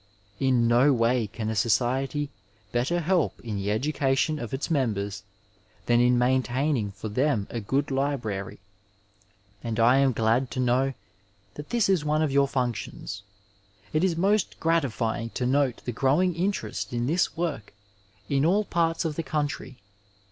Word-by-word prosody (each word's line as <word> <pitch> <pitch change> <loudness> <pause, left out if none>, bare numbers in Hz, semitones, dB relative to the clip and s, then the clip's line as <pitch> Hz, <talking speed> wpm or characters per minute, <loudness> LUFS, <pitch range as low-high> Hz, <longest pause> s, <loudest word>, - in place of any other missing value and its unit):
In 130 -3 +3
no 125 +5 +5
way 120 -2 +2
can 110 +2 -4
a - - -3
society 130 +7 0 0.4
better 135 +9 0
help 175 -1 +1
in 110 -3 -4
the 100 +1 -2
education 135 +5 0
of 120 - -6
its 135 +5 -3
members 105 -9 -1 0.6
than 120 0 +3
in 125 0 +4
maintaining 130 -1 +1
for 110 - -7
them 120 -1 +1
a 120 - -3
good 135 +7 -1
library, 120 -9 -2 1.0
and 115 -1 -3
I 120 +4 +5
am 135 -1 +4
glad 115 +3 +1
to 130 - -3
know 130 +2 +1 0.6
that 150 0 -9
this 235 -3 +2
is 190 -5 +2
one 150 +1 +1
of 150 - 0
your 140 0 +3
functions. 120 -5 -3 0.7
It 155 +2 +2
is 180 -3 +1
most 200 +3 +1
gratifying 125 -8 0
to 125 - -1
note 135 -1 +1
the 125 - -2
growing 145 +10 +2
interest 185 -5 -2
in 120 0 -1
this 165 +6 0
work 155 -11 -3 0.6
in 135 +3 +1
all 200 +6 +3
parts 165 -1 0
of 155 -2 -2
the - - 0
country. 145 -4 -3
135 Hz, 155 wpm, -26 LUFS, 120-150 Hz, 1.0 s, no